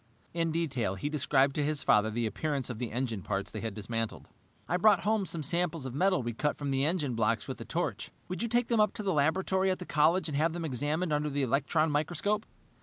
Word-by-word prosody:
In 165 -1 0
detail, 140 - -1
he 145 +10 -3
described 140 -2 +2
to 150 - 0
his 150 -1 -1
father 105 +1 +4
the 115 +2 -1
appearance 135 +4 -2
of 115 - -7
the 120 -3 -3
engine 115 -3 -2
parts 100 +1 -3
they 110 - -5
had 110 -3 -4
dismantled. 115 +1 -4 0.4
"I 180 - +1
brought 195 -1 +5
home 210 0 +1
some 165 -2 -3
samples 170 -1 0
of 130 - -5
metal 185 0 +2
we 120 0 -3
cut 150 +6 -1
from 145 -1 -3
the 135 0 +1
engine 150 -4 0
blocks 115 -1 0
with - - -6
a - - -6
torch. - - -2 0.2
Would 185 -1 -4
you 235 - 0
take 240 +1 +1
them 230 -2 +1
up 210 - +3
to 215 - -4
the 195 -2 +1
laboratory 190 +6 +2
at 185 - +1
the 180 - -7
college 160 +4 +3
and 150 - -3
have 160 +3 +2
them 170 -1 -4
examined 150 +5 -1
under 150 0 0
the 140 -1 -1
electron 150 +5 +1
microscope?" 175 +8 0
150 Hz, 240 wpm, -30 LUFS, 125-175 Hz, 0.4 s, brought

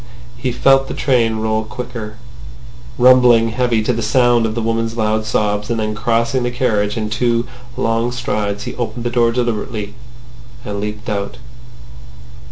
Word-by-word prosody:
He 125 - -2
felt 135 +2 +3
the - - -5
train 120 -5 +2
roll 110 0 0
quicker, 115 -1 -7 0.8
rumbling 125 -2 +6
heavily 115 -1 +1
to 125 - +1
the 115 - -2
sound 120 +1 +3
of 110 - -4
the 115 - -1
woman's 115 0 -1
loud 110 0 0
sobs, 105 0 0
and 115 -1 -1
then 110 0 -1
crossing 115 +3 0
the 120 - 0
carriage 110 -4 0
in 110 -1 -1
two 115 +2 0 0.3
long 115 +1 0
strides 105 -4 -2
he - - -5
opened 120 0 -3
the 120 - -2
door 120 -1 +3
deliberately, 115 -3 -2 0.7
and 100 -1 -4
leaped 105 +1 -5
out. 100 -2 -3
115 Hz, 160 wpm, -18 LUFS, 110-120 Hz, 0.8 s, rumbling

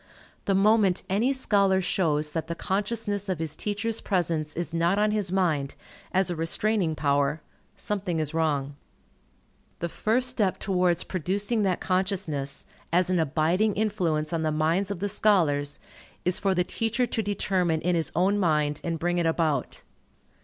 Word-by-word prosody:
The 195 - +2
moment 200 -2 +3
any 225 +7 +2
scholar 200 -7 +2
shows 155 -5 0
that 160 +1 -3
the 170 - -3
consciousness 205 +1 -2
of 185 - 0
his 155 -1 -3
teacher's 210 +4 -2
presence 165 -5 -1
is 170 0 -4
not 170 +3 +2
on 210 +1 +2
his 205 -4 -1
mind, 160 -8 0 0.4
as 190 -1 +1
a - - -2
restraining 165 +1 +1
power, 145 +1 +1 0.4
something 190 -5 -2
is 155 0 -1
wrong. 145 -4 0 1.0
The 170 - -3
first 235 +8 +1
step 215 -7 0
towards 180 -3 +1
producing 200 +5 -1
that 190 -3 0
consciousness, 185 -7 -1 0.3
as 180 +2 +2
an 180 - +2
abiding 165 +7 +1
influence 175 -8 0
on 165 - 0
the 155 -1 0
minds 165 +6 +1
of 195 -3 -4
the 205 - 0
scholars, 155 -9 +2 0.5
is 180 0 +2
for 195 -1 +1
the 180 - +2
teacher 225 +5 -1
to 230 - -2
determine 190 -5 0
in 180 +1 +1
his 165 -2 0
own 195 +4 +2
mind 150 -5 +1
and 165 -1 -2
bring 175 +2 0
it 170 - +1
about. 160 -5 -1
180 Hz, 160 wpm, -26 LUFS, 160-205 Hz, 1.0 s, moment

